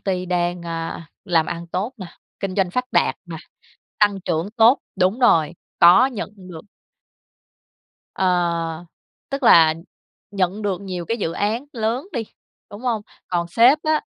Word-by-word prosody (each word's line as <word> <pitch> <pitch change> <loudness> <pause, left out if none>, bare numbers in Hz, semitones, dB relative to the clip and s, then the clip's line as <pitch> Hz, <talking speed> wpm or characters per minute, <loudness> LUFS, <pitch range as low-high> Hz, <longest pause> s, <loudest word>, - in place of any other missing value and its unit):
ty 185 -2 -2
đang, 175 0 -1
a, 165 0 -5 0.2
làm 165 -4 +2
ăn 170 0 -5
tốt 190 +9 -3
nè, 190 -4 -8 0.3
kinh 195 -2 -3
doanh 190 -3 +1
phát 250 +5 -1
đạt - - +2
nè, - - -7 0.6
tăng 205 -2 +2
trưởng 175 +1 -2
tốt 230 +4 +6 0.2
đúng 190 +6 +1
rồi, 165 -9 +4 0.3
có 180 +10 +7
nhận 240 -6 -5
được 180 -4 -11 1.5
Ờ, 170 -2 -1 0.5
tức 275 0 -4
là 160 -8 +6 0.6
nhận 195 +1 -1
được 195 -2 -2
nhiều 180 -3 -5
cái 230 - -2
dự 165 -6 -3
án 220 +8 -1
lớn 235 +6 -2
đi, 235 - -2 0.5
đúng 205 +2 -10
hông? 230 -4 -1 0.3
Còn 170 -1 -1
sếp 240 - +5
á, 310 0 +1
185 Hz, 155 wpm, -21 LUFS, 170-220 Hz, 1.5 s, có